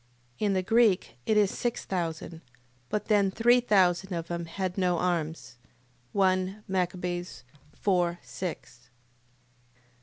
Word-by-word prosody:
In 205 -2 +1
the 185 -1 +1
Greek 200 - +3
it 215 - +3
is 205 -2 +3
six 240 -1 -2
thousand. 165 -2 -4 0.5
But 210 - -2
then 205 -3 +3
three 240 +5 +4
thousand 190 -5 +2
of 170 -1 -4
them 170 -1 -3
had 185 +2 -3
no 180 -2 +1
arms. 160 -8 -2 0.6
1 190 +1 +1
Mac. 185 -2 0
4.6. 175 -3 -5 0.4
8:17. 175 - -2
185 Hz, 120 wpm, -28 LUFS, 175-200 Hz, 0.6 s, three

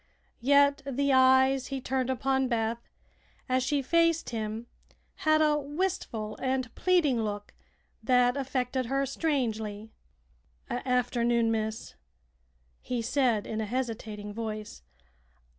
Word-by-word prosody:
Yet 280 +2 +4
the 275 0 0
eyes 260 0 +5
he 270 -1 -3
turned 260 0 -1
upon 265 +1 +1
Beth, 230 -1 -2 0.6
as 255 -1 +2
she 275 +2 0
faced 335 +2 +2
him 220 0 -4 0.5
had 310 0 +3
a 300 -1 +3
wistful 290 - -3
and 260 -2 -1
pleading 315 -10 +2
look 205 -1 -4 0.5
that 245 +2 +3
affected 260 -2 -2
her 275 +2 0
strangely. 225 -8 -2 0.8
"Afternoon, 240 -2 +1
miss," 220 0 -3 0.9
he 245 -2 -3
said, 235 -4 +1
in 220 0 -3
a - - -2
hesitating 220 -4 -4
voice. 215 - -6
255 Hz, 110 wpm, -29 LUFS, 225-275 Hz, 0.9 s, eyes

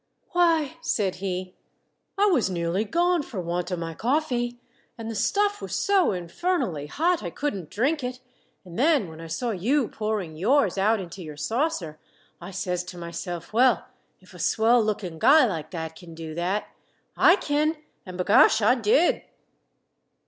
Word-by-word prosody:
"Why," 330 -4 +2
said 195 - -1
he, 185 -1 -4 0.6
"I 405 - +4
was 320 - +3
nearly 175 +3 -1
gone 345 - +2
for 235 -8 -7
want 175 0 -2
of 180 - -2
my 165 -1 -4
coffee, 245 - -1 0.4
and 230 -1 -5
the - - -5
stuff 410 - +1
was - - -4
so 395 -3 +3
infernally 180 - -2
hot 335 - +1
I 175 - -4
couldn't 195 - -4
drink 275 +7 0
it, 250 0 -4 0.5
and 175 +2 -8
then 280 - +3
when 160 0 -10
I 165 - -8
saw 230 +9 -2
you 230 +7 +1
pouring 210 -7 -3
yours 220 - +2
out 210 +3 +2
into 185 0 -8
your 155 -3 -8
saucer, 180 - -2 0.4
I 175 - -8
says 180 -2 -2
to 180 - -9
myself, 170 0 -6
'_Well, 240 -2 +4 0.4
if 185 0 -19
a 180 - -12
swell 225 +8 +3
lookin' 195 -6 -3
guy 300 - +6
like 165 -9 -3
that 160 -2 -5
kin 170 -2 -12
do 160 -1 -7
that, 180 +5 -2 0.5
I 355 - +6
kin, 305 -2 0 0.3
an' 185 -2 -9
b'gosh, 200 +3 +5
I 220 +3 +4
did! 250 +8 +3
210 Hz, 165 wpm, -25 LUFS, 175-280 Hz, 0.6 s, guy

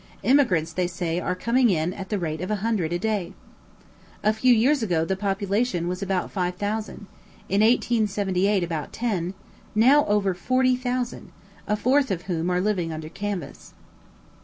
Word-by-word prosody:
Emigrants, 195 - +3
they 180 +1 0
say, 175 -1 -2
are 180 0 -2
coming 235 +5 +2
in 170 -1 0
at 190 -1 -8
the 210 - 0
rate 160 -3 -3
of 185 - -4
a 215 - +1
hundred 200 -8 0
a 175 - 0
day. 205 -2 -2 0.9
A 215 - +3
few 250 +4 +3
years 250 +5 +4
ago 175 -7 +1
the 190 - -1
population 200 -1 -1
was 180 +2 -3
about 190 -2 -1
five 180 -2 -1
thousand, 210 +2 -4 0.4
in 200 +2 +2
1878 205 -4 +2
about 165 -3 -4
ten, 195 -6 -2 0.4
now 265 +7 +6
over 205 -2 +2
forty 255 +7 +2
thousand, 250 -1 -3 0.4
a 210 - +1
fourth 265 +6 +2
of 180 -2 -2
whom 175 -2 -2
are 180 0 +1
living 180 -4 0
under 155 0 -6
canvas. 200 0 -6
195 Hz, 165 wpm, -24 LUFS, 180-225 Hz, 0.9 s, now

